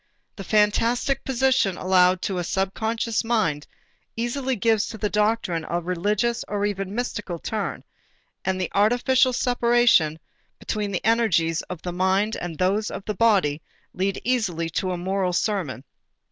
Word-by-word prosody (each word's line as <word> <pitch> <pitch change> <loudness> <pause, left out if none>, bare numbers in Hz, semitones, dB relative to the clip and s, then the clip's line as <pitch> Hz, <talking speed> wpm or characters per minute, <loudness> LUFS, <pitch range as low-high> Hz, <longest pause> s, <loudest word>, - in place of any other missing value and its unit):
The 195 - -7
fantastic 230 +6 +1
position 260 -7 +1
allowed 185 0 +3
to 190 -3 -1
a - - -2
subconscious 220 +6 -1
mind 205 -11 0 0.5
easily 255 +3 -1
gives 220 0 +1
to 220 - -7
the 210 0 -2
doctrine 210 -6 0
a 175 - 0
religious 205 +7 -1
or 205 0 -1
even 195 -2 -2
a - - -9
mystical 210 -5 -3
turn 210 +4 -4 0.6
and 190 0 -1
the 185 - -2
artificial 245 +5 +3
separation 240 -10 +3 0.4
between 210 -1 -3
the 190 - -3
energies 175 -8 +2
of 180 -3 -7
the 180 - -4
mind 190 +4 +1
and 170 -3 -5
those 200 +4 +1
of - - -7
the 210 - -2
body 190 -9 +2 0.3
leads 195 +1 -1
easily 185 -10 -1
to 185 - -1
a 180 - -2
moral 185 0 -1
sermon. 175 - -1
205 Hz, 150 wpm, -24 LUFS, 180-230 Hz, 0.6 s, allowed